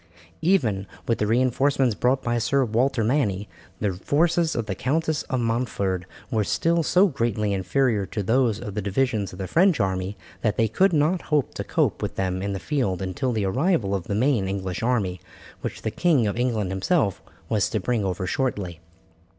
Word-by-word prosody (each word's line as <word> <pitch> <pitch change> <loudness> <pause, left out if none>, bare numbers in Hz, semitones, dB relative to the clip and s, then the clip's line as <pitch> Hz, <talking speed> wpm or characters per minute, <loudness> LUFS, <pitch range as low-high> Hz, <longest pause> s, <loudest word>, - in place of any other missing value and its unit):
Even 120 - +2 0.2
with 115 - +1
the 105 - +1
reinforcements 130 +2 +2
brought 125 +5 +1
by 120 0 0
Sir 135 +3 +2
Walter 120 +2 +1
Manny, 105 -5 0 0.3
the 100 -3 0
forces 160 - +1
of 115 - -1
the 105 - -3
Countess 155 - 0
of 130 -2 0
Montford 105 -6 -1 0.2
were 110 -1 +2
still 165 +10 +1
so 180 +4 +4
greatly 115 - 0
inferior 100 +2 +1
to 105 - -3
those 115 0 +2
of 105 - -6
the 105 - -2
divisions 105 0 0
of 90 - -10
the 95 - -4
French 175 - +3
army 95 0 -1 0.2
that 110 -2 0
they 115 - +3
could 185 - +3
not 160 +3 +2
hope 150 -3 +1
to - - -4
cope - - 0
with - - -3
them 95 -1 -1
in 100 0 -2
the 95 - -3
field 110 - -1
until 95 +8 -2
the 110 -4 0
arrival 130 - +1
of 95 -3 -2
the 100 - -2
main 115 -3 +2
English 95 -1 -3
army, 105 -7 0 0.4
which - - -5
the 110 - -1
King 155 -7 +2
of 100 - -1
England 115 -6 0
himself 100 - +1 0.3
was 105 -1 +1
to 110 - -1
bring 115 +2 0
over 95 -1 -2
shortly. 95 - -2
115 Hz, 190 wpm, -24 LUFS, 100-135 Hz, 0.4 s, so